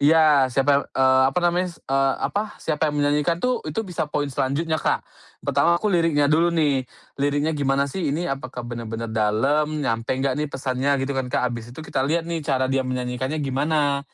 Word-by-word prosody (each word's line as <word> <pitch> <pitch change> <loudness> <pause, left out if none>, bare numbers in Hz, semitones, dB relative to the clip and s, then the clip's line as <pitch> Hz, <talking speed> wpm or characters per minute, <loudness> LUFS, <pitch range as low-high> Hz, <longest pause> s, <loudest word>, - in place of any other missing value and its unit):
Ya, 150 -2 +5
siapa, 140 +2 +2
eee, 130 0 +5
apa 135 - -1
namanya, 175 +1 +2
eee, 135 0 +1
apa, 210 +1 -2
siapa 155 0 -1
yang 150 - -3
menyanyikan 150 +3 +1
tuh, 250 +5 0
itu 220 +9 -2
bisa 180 -5 -3
poin 145 0 -1
selanjutnya, 155 +5 -1
Kak. - - 0 0.4
Pertama 140 +5 +3
aku 205 +3 -1
liriknya 165 -4 +3
dulu 155 +4 +3
nih, 145 -6 +1 0.3
liriknya 145 +2 +1
gimana 140 -1 +1
sih 155 +3 -3
ini, 155 +5 -1
apakah 130 -5 -4
benar-benar 115 -1 -5
dalam, 135 +9 +1
nyampe 115 -1 -1
enggak 135 +1 -1
nih 150 - -1
pesannya, 135 +1 0
gitu 140 - -2
kan, 130 -2 -2
Kak. 125 0 0
Habis 115 0 -7
itu 160 - -7
kita 135 - -2
lihat 165 +2 +1
nih 170 -1 -3
cara 135 -3 0
dia 135 +1 +1
menyanyikannya 130 +3 -2
gimana, 140 +1 +1
140 Hz, 185 wpm, -23 LUFS, 130-155 Hz, 0.4 s, Ya